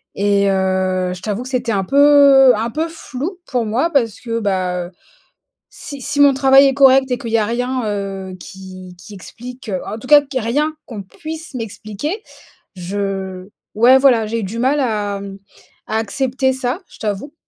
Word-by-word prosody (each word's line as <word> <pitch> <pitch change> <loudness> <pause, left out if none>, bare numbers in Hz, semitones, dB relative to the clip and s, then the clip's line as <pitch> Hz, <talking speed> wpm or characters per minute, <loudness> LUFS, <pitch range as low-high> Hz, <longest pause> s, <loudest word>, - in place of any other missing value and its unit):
et, 200 0 +2
heu, 185 -1 0
je 175 - -12
t'avoue 215 +3 -3
que 255 - -8
c'était 245 -3 -1
un 195 - 0
peu 280 -1 +6
un 225 +2 -2
peu 320 +2 -2
flou 330 +3 -6
pour 245 -4 -1
moi 250 +10 0
parce 230 -7 +1
que, 230 -1 -3
bah, 185 -3 -1
heu, - - -16 0.8
si 280 -3 -8
si 285 +1 -3
mon 280 -1 +6
travail 270 +1 +5
est 270 - 0
correct 270 -1 +5
et 250 - +1
qu'il 230 -2 -6
y 230 - +3
a 210 - +1
rien, 245 +2 -2
heu, 195 -2 -4
qui 185 0 -11
qui 205 - -12
explique 245 +4 -10 0.2
en 215 - -5
tout 255 - -11
cas 295 -1 +7
que 270 -2 -4
rien 290 +7 -1
qu'on 220 -6 -7
puisse 315 +8 -9
m'expliquer. 225 - -5 0.6
Je 190 0 -4 0.3
ouais 245 +5 +6
voilà 245 -5 +3
j'ai 230 +1 -3
du 205 +4 -5
mal 265 +5 +1
à 210 -5 -1 0.7
à 220 - -1
accepter 260 +4 -1
ça, 260 +5 -3
je - - -17
t'avoue. 215 +8 -4
230 Hz, 180 wpm, -18 LUFS, 200-270 Hz, 0.8 s, cas